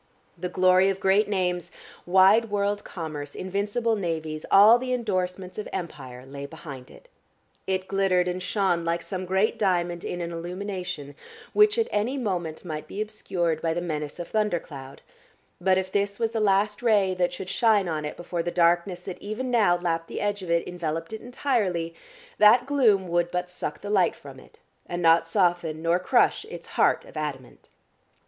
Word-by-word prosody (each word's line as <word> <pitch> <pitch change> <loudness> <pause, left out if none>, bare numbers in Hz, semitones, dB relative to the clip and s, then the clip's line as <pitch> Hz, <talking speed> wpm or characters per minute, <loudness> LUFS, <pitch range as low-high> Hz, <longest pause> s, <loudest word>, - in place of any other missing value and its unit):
The 180 +1 -4
glory 185 +1 +4
of 195 -1 -2
great 195 +3 +3
names, 180 -3 -1 0.4
wide 190 +5 +5
world 205 0 -1
commerce, 150 -4 -6
invincible 205 +5 -1
navies, 160 -5 -3
all 215 +5 +8
the 255 0 -2
endorsements 185 -5 -2
of 210 - -5
Empire, 130 -8 -7
lay 140 +1 -7
behind 140 -5 -10
it. - - -16 0.6
It 190 0 -1
glittered 190 -2 +2
and 180 +1 -2
shone 185 -4 0
like 170 0 -1
some 185 -2 -5
great 195 +5 +1
diamond 175 -4 0
in 175 - -4
an 170 -1 -4
illumination 180 -3 -5 0.4
which 420 0 +5
at 455 - +2
any 225 +7 0
moment 180 - -3
might 155 -3 -5
be 200 - -7
obscured 180 -6 -2
by 165 -1 0
the - - 0
menace 150 -4 -4
of 175 -1 -6
thundercloud, 170 -10 -3 0.6
but, 185 +1 +3
if 185 0 -2
this 200 0 0
was 225 -1 0
the 225 - -1
last 205 +1 +2
ray 205 -5 +3
that 180 -1 0
should 185 - -7
shine 215 -5 +3
on 155 -2 -2
it 150 - -5
before 175 0 -3
the 170 - -2
darkness 175 +1 +2
that 185 -1 -7
even 225 +5 -4
now 210 -7 +4
lapped 165 -1 -2
the - - -5
edge 205 -1 -1
of 180 - -7
it 170 0 +1
enveloped 165 0 -4
it 220 - -6
entirely, 210 -10 -1 0.5
that 215 +4 +7
gloom 230 -9 +3
would 175 0 +1
but 180 0 -2
suck 150 -4 -5
the 205 - -6
light 190 -4 +3
from 135 -2 -12
it, - - -19 0.3
and 175 0 -4
not 165 0 +5
soften 175 -4 +1
nor 170 +2 +2
crush 180 - +2
its - - -9
heart - - +2
of - - -15
adamant.... 145 -5 -6
185 Hz, 180 wpm, -26 LUFS, 170-205 Hz, 0.6 s, all